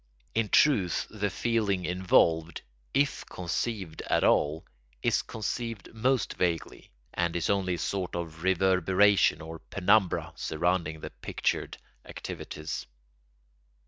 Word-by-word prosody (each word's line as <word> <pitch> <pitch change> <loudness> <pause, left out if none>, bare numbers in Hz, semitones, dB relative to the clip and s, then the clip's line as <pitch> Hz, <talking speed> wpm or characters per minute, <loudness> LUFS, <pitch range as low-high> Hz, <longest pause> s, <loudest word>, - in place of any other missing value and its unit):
In 115 -2 0
truth 100 - +3
the 105 -1 -1
feeling 105 -5 0
involved, 85 -3 +2 0.3
if 140 +1 +1
conceived 90 -1 -3
at - - +2
all, 75 +2 +2 0.4
is - - +3
conceived 115 -1 -5
most 125 +1 +1
vaguely, 85 -2 -2 0.2
and 85 -1 0
is 85 - +1
only 95 -3 +1
a - - -6
sort 95 0 -2
of 80 -2 -5
reverberation 95 +2 +3
or 80 +1 -8
penumbra 100 +2 +1
surrounding 80 -1 -1
the - - -6
pictured - - -2 0.3
activities. 75 0 -6
95 Hz, 110 wpm, -29 LUFS, 85-105 Hz, 0.4 s, truth